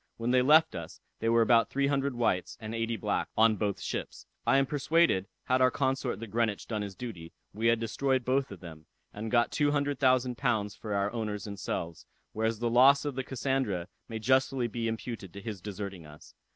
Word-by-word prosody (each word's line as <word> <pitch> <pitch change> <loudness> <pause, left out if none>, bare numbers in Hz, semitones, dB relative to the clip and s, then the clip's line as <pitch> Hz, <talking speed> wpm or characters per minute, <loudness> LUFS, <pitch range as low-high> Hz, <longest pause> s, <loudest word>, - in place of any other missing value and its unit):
When 115 +1 -1
they 130 0 +5
left 155 +5 +5
us, 85 -1 -7 0.2
they 115 - 0
were 115 0 +5
about 115 0 +4
three 140 0 0
hundred 140 -1 0
whites, 105 -7 0
and 110 -1 -6
eighty 115 0 -1
blacks, - - -1
on 110 0 +5
both 100 -1 -2
ships. - - -5 0.2
I 135 - +5
am 135 - +3
persuaded, 145 - +2 0.2
had 130 0 +1
our 130 - +6
consort 130 -1 -1
the 115 - -5
Greenwich 110 -1 -1
done 110 -2 -2
his 100 -2 -6
duty, 90 -9 -8 0.2
we 110 +2 0
had 115 0 +4
destroyed 130 +3 0
both 130 +1 +1
of 95 - -10
them, 80 -3 -11 0.3
and 110 +2 -5
got 120 0 +2
two 145 -1 +2
hundred 145 -1 0
thousand 130 -2 +2
pounds 105 -3 0
for 105 -1 -5
our 100 +1 0
owners 105 -4 -3
and 100 -2 -7
selves; 85 -3 -4 0.3
whereas 110 +1 0
the 120 +2 -1
loss 130 +5 +5
of 145 - -2
the 130 +1 -3
Cassandra 130 -9 -1 0.2
may 115 - -4
justly 130 +2 +2
be 115 0 -3
imputed 110 -4 -5
to 100 - -8
his 100 -2 -6
deserting 100 -4 -6
us. 75 0 -15
115 Hz, 210 wpm, -29 LUFS, 105-130 Hz, 0.3 s, our